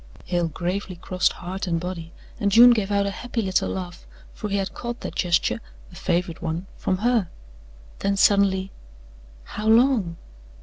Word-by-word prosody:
Hale 175 -2 0
gravely 180 +4 -3
crossed 180 +1 0
heart 185 +2 -5
and 170 -1 0
body 170 -2 -6 0.3
and 200 -3 +1
June 240 +4 +9
gave 215 -4 +1
out 200 -1 +2
a 200 - -1
happy 240 +4 -5
little 190 -4 +1
laugh 180 -2 -6 0.3
for 210 - -5
he 200 - 0
had 195 -1 -2
caught 240 0 -6
that - - -5
gesture 175 -2 +1 0.3
a - - -14
favourite 170 -1 -1
one 165 +2 -3
from 185 - -1
her. 235 -8 +2 0.7
Then 200 0 0
suddenly: 195 -1 +3 0.7
"How 210 - -5
long?" 225 -7 +4
190 Hz, 165 wpm, -24 LUFS, 175-210 Hz, 0.7 s, June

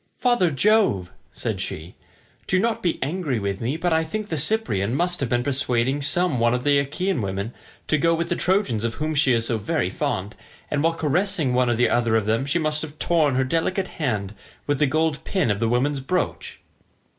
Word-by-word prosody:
"Father 240 -8 +2
Jove," 145 - +2 0.2
said - - -4
she, 80 +4 -5 0.5
"do 185 - +2
not 225 +3 0
be 175 - 0
angry 150 -3 -2
with 100 -2 -3
me, 125 +7 -1
but 175 0 0
I 160 0 +2
think 210 +6 -5
the 160 - -1
Cyprian 140 - 0
must 175 +3 0
have 135 - -2
been 120 0 +1
persuading 130 0 0
some 155 -1 +1
one 120 +1 +3
of 125 - -3
the 145 0 +4
Achaean 150 +3 -1
women 100 +3 -3 0.3
to 155 - +2
go 165 +2 +3
with 170 +1 -2
the 175 - +1
Trojans 180 - +1
of 115 -1 -2
whom 155 +1 -2
she 140 -3 +4
is 115 -1 +2
so 115 -1 -1
very 100 - -1
fond, 95 +3 -3 0.4
and 145 - +1
while 165 +1 +2
caressing 160 -3 0
one 125 0 +2
or 120 +1 +3
other 115 -2 +2
of 110 -2 +1
them 115 +5 0
she 145 - +1
must 155 -2 0
have 155 -1 -8
torn 155 -6 +2
her 130 - +2
delicate 165 +7 -1
hand 105 -8 -1 0.3
with 145 -2 0
the 150 - +4
gold 155 +1 0
pin 185 - 0
of 100 - -1
the 115 0 +1
woman's 135 +4 +1
brooch." 180 +8 -3
145 Hz, 210 wpm, -23 LUFS, 120-165 Hz, 0.5 s, the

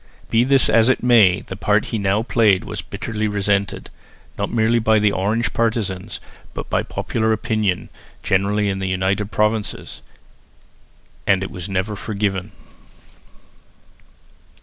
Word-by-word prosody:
Be 115 +1 +4
this 135 0 +4
as 115 +2 +4
it 130 - +1
may, 110 -7 +5
the 95 - -8
part 105 +1 +1
that - - -7
he 110 - -2
now 100 +2 +1
played 110 -5 +3
was - - -5
bitterly 110 -1 -4
resented, 100 -1 -1 0.4
not - - -2
merely 115 +1 +2
by 110 -1 +3
the 105 -1 +3
Orange 105 +5 -1
partisans, 105 -4 -2 0.4
but - - -6
by - - +2
popular 110 -1 -2
opinion 110 -4 -1 0.3
generally 100 +2 +1
in 95 -1 -1
the 95 -1 -2
United 95 +2 0
Provinces, 105 0 -1 1.3
and 95 -1 +3
it - - -6
was 90 +2 -7
never 95 +2 -2
forgiven. 100 -2 -3
105 Hz, 140 wpm, -20 LUFS, 95-110 Hz, 1.3 s, may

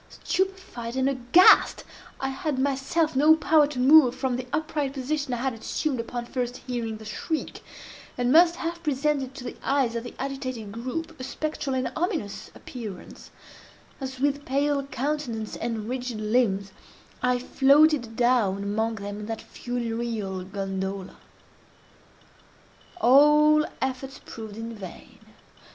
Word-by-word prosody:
Stupefied 370 -12 -2
and 260 0 +1
aghast, 270 +6 +5 0.4
I 270 - -1
had 270 +1 -3
myself 280 +4 0
no 300 +4 +6
power 315 -2 +4
to 290 -3 -7
move 260 0 +6
from 260 -2 -1
the 250 0 -5
upright 300 -2 -1
position 280 +1 -2
I 245 - 0
had 260 +2 -1
assumed 255 +4 -2
upon 240 +1 -4
first 245 0 -3
hearing 235 -3 -4
the 220 - -12
shriek, 310 +9 -4 0.6
and 245 0 +1
must 340 +3 +6
have 340 0 -4
presented 280 -3 -1
to 255 - -8
the - - -6
eyes 265 -4 +1
of 230 - -2
the 245 - -9
agitated 255 -6 -5
group 260 +8 -5
a - - -6
spectral 300 0 -3
and 255 0 -1
ominous 320 - -3
appearance, 215 -7 -9 0.7
as 265 -1 -6
with 285 +1 0
pale 280 +1 0
countenance 260 -5 -3
and 225 -2 -3
rigid 250 -2 -4
limbs, 210 -3 +1 0.5
I 250 0 +2
floated 270 -1 +3
down 230 -6 +2
among 220 +3 -1
them 205 0 -6
in 210 - -6
that 225 -1 -5
funereal 230 -5 -4
gondola. 195 0 -4 1.8
All 300 +3 +6
efforts 265 0 -4
proved 220 -2 -8
in 230 +1 -5
vain. 195 -5 -11
255 Hz, 140 wpm, -26 LUFS, 230-290 Hz, 1.8 s, no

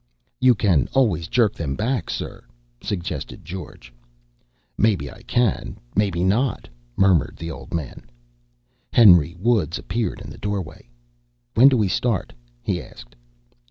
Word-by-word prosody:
"You 130 -1 +5
can 90 - +2
always 95 -12 +2
jerk 110 +2 +2
them 70 -5 -3
back, 115 - -1
sir," - - -5 0.4
suggested 90 -4 -5
George. 80 -9 -9 0.8
"Maybe 95 -10 +1
I - - -14
can, 120 -5 0 0.2
maybe 95 -4 +1
not," 110 +6 0 0.3
murmured 95 -6 +3
the 85 0 -5
old - - -10
man. 75 -7 -5 0.8
Henry 90 -7 +6
Woods 100 -6 +1
appeared 110 +4 -3
in - - -9
the - - -11
doorway. 95 -11 -5 0.6
"When 125 +5 +7
do 130 - +2
we 105 -3 +2
start?" 110 +2 -1 0.3
he - - -1
asked. - - -14
95 Hz, 130 wpm, -22 LUFS, 80-115 Hz, 0.8 s, When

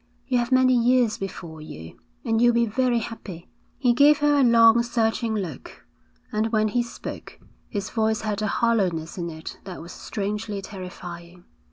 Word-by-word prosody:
You 250 -2 +2
have 240 +1 -2
many 255 0 +5
years 245 -2 +3
before 170 -5 -7
you, 80 - -10 0.3
and 225 -1 +1
you'll 240 -1 +5
be 235 0 +3
very 245 +2 +1
happy.' 215 -7 -7 0.3
He 245 -2 +3
gave 290 +4 +6
her 290 0 +3
a - - +5
long, 230 -1 +6
searching 230 -1 0
look; 175 -10 -6 0.5
and 215 +1 0
when 215 -1 +2
he 240 +3 +1
spoke, 235 - -8 0.3
his 200 -3 -4
voice 220 -1 0
had 215 -1 -2
a 215 - 0
hollowness 190 -8 0
in 170 -1 -3
it 160 0 -8
that 185 -2 -7
was 170 +2 -9
strangely 210 0 -4
terrifying. 180 -2 -9
220 Hz, 170 wpm, -24 LUFS, 185-240 Hz, 0.5 s, gave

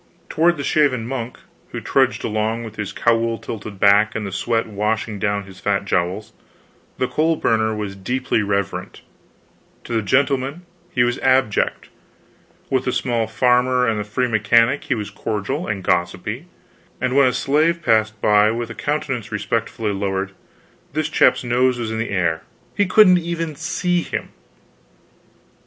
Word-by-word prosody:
Toward 170 +1 +2
the 140 - -4
shaven 140 -7 +2
monk 125 -2 -5 0.3
who - - -5
trudged - - +1
along 110 +2 -1
with 110 -2 -9
his 105 -2 -4
cowl 115 0 +1
tilted 105 -3 -7
back 100 +2 +4
and 110 - -3
the 100 - -5
sweat 115 +4 0
washing 105 0 -2
down 100 -1 0
his 95 -1 -14
fat 100 -1 0
jowls, 100 +4 -1 0.6
the 130 - 0
coal 160 +4 +1
burner 110 -5 +1
was 105 -2 -4
deeply 125 +4 -1
reverent; 100 -1 -3 0.8
to - - -6
the 110 - +1
gentleman 135 - 0 0.2
he 125 -8 +2
was 120 0 0
abject; 130 -5 +1 0.8
with 130 -1 0
the 125 - +1
small 120 -3 0
farmer 125 +2 +2
and 110 -2 0
the - - -2
free 125 +5 -1
mechanic 115 +4 +3
he 130 - 0
was 105 -3 -5
cordial 110 - -3
and 100 -2 -3
gossipy; 95 - -1 0.5
and 130 0 -1
when 140 -1 +6
a - - +3
slave 155 +6 +1
passed 110 -3 +2
by 105 0 +4
with 115 0 -3
a - - -5
countenance 135 -6 -3
respectfully 110 0 -2
lowered, 95 -1 -2 0.6
this 155 +1 -1
chap's 155 - +3
nose 125 +1 +2
was 115 -2 -3
in 110 - -3
the 115 - -2
air 85 -5 0 0.3
he 205 - +2
couldn't 185 -1 +6
even 165 -2 -3
see 175 +3 -1
him. - - -4
115 Hz, 160 wpm, -21 LUFS, 105-130 Hz, 0.8 s, when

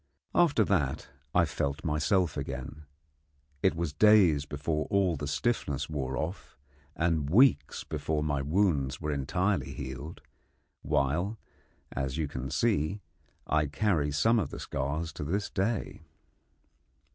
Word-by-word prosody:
After 155 -10 +4
that 85 -10 0 0.3
I - - +5
felt 70 +1 -2
myself 80 +2 +1
again. 70 +1 -6 0.8
It - - +3
was 85 -3 -2
days 90 -6 +5
before 75 +1 -2
all 95 -4 +2
the 75 -1 -4
stiffness 75 - -1
wore 65 -4 -2
off, 80 +3 -5 0.4
and 80 -4 0
weeks 95 - +4
before 75 0 -2
my 70 -2 0
wounds 75 -3 +1
were 75 - -2
entirely 90 +8 0
healed; 70 +4 -7 0.6
while, 85 +11 0 0.5
as 65 +1 -3
you 80 -2 0
can 65 -1 -5
see, 95 - 0 0.4
I 75 -1 +1
carry 75 -1 +1
some 110 +11 +3
of 90 - -2
the - - -7
scars 75 +4 -3
to - - -5
this 100 +7 -2
day. 105 -1 -2
75 Hz, 130 wpm, -29 LUFS, 70-95 Hz, 0.8 s, I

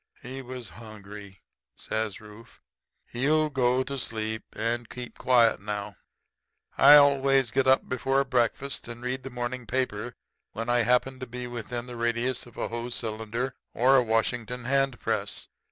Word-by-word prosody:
"'He 130 +2 -6
was 125 -1 -7
hungry,' 105 -3 -11 0.3
says 110 -3 -3
Rufe. 105 +1 -14 0.5
'He'll 150 +5 +1
go 130 -1 +2
to 140 0 -4
sleep 110 -2 -3
and 115 +1 -2
keep 125 -1 -8
quiet 120 -6 +4
now.' 105 0 -4 0.8
"I 145 +2 +9
always 135 -3 +5
get 130 +3 +2
up 130 0 +4
before 135 +2 +1
breakfast 130 +1 -1
and 120 +1 -8
read 130 +1 -2
the 135 - -7
morning 120 -1 -4
paper 125 -2 -2 0.4
whenever 115 +2 -2
I 120 0 +4
happen 125 +2 +2
to 130 - -6
be 125 +1 -6
within 120 0 -5
the 125 -1 -8
radius 120 +2 -1
of 120 - -16
a - - -2
Hoe 120 +1 -4
cylinder 115 +2 -3 0.2
or 130 +3 +5
a - - +6
Washington 120 +2 -1
hand 135 -1 +1
press. - - -2
120 Hz, 155 wpm, -27 LUFS, 115-130 Hz, 0.8 s, I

